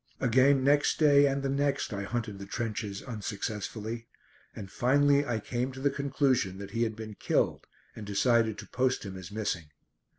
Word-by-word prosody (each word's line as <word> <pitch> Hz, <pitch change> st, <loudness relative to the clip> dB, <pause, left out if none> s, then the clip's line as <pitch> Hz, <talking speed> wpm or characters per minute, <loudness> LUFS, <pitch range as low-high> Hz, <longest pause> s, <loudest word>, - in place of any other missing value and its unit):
Again 130 Hz, +2 st, +4 dB
next 145 Hz, +2 st, +3 dB
day, 145 Hz, -2 st, +6 dB
and 140 Hz, 0 st, -1 dB
the 135 Hz, -, 0 dB
next, 140 Hz, -3 st, 0 dB
I 100 Hz, 0 st, -3 dB
hunted 110 Hz, -2 st, -3 dB
the 100 Hz, -, -8 dB
trenches, 105 Hz, -2 st, -4 dB
unsuccessfully, 110 Hz, 0 st, -5 dB, 0.5 s
and 95 Hz, -3 st, -8 dB
finally 140 Hz, +4 st, +3 dB
I 120 Hz, -2 st, 0 dB
came 125 Hz, +4 st, -2 dB
to 130 Hz, -, -9 dB
the 140 Hz, +1 st, +1 dB
conclusion 135 Hz, -8 st, 0 dB
that 100 Hz, 0 st, -8 dB
he 115 Hz, +2 st, -2 dB
had 110 Hz, -2 st, 0 dB
been 110 Hz, -1 st, -7 dB
killed -, -, 0 dB, 0.3 s
and 110 Hz, -, -8 dB
decided 110 Hz, +2 st, +2 dB
to -, -, -9 dB
post 130 Hz, -2 st, 0 dB
him 95 Hz, -1 st, -6 dB
as 90 Hz, -2 st, -8 dB
missing. 100 Hz, -6 st, -2 dB
115 Hz, 175 wpm, -29 LUFS, 105-135 Hz, 0.5 s, day